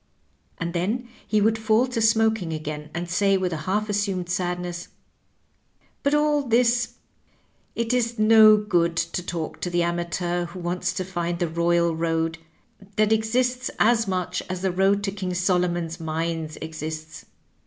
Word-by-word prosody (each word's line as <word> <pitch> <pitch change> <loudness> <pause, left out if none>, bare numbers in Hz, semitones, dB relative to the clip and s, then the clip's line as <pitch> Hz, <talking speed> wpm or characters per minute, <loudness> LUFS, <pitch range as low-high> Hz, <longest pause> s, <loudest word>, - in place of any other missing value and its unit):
And 170 0 -3
then 215 +8 -1 0.2
he 215 -1 +2
would 220 +1 +2
fall 220 +2 +3
to 245 -3 -3
smoking 220 -5 +2
again, 150 -1 -5
and 175 +2 -4
say 195 +3 +2
with 185 -2 -1
a - - -2
half 210 +2 +1
assumed 200 -4 -1
sadness, 180 -1 -3 0.6
" - - -40
But 285 +1 +2
all 295 0 +3
this 245 -1 +2 0.8
it 230 +1 -1
is 235 -1 0
no 215 0 +7
good 175 -5 +1
to 170 +2 -1
talk 170 -2 -5
to 180 - -2
the 175 0 +1
amateur 175 +1 -1
who 175 +2 -9
wants 175 +1 -1
to 185 0 -3
find 175 -2 -2
the 175 - 0
royal 170 0 +1
road, 165 0 -1 0.6
that 215 0 +2
exists 250 +4 0
as 225 -1 +3
much 180 -1 -2
as 185 0 -4
the 190 - +1
road 195 +2 +2
to 195 - -1
King 190 -2 -4
Solomon's 175 -2 0
mines 160 0 -3
exists. 155 0 -6
180 Hz, 160 wpm, -24 LUFS, 170-220 Hz, 0.8 s, no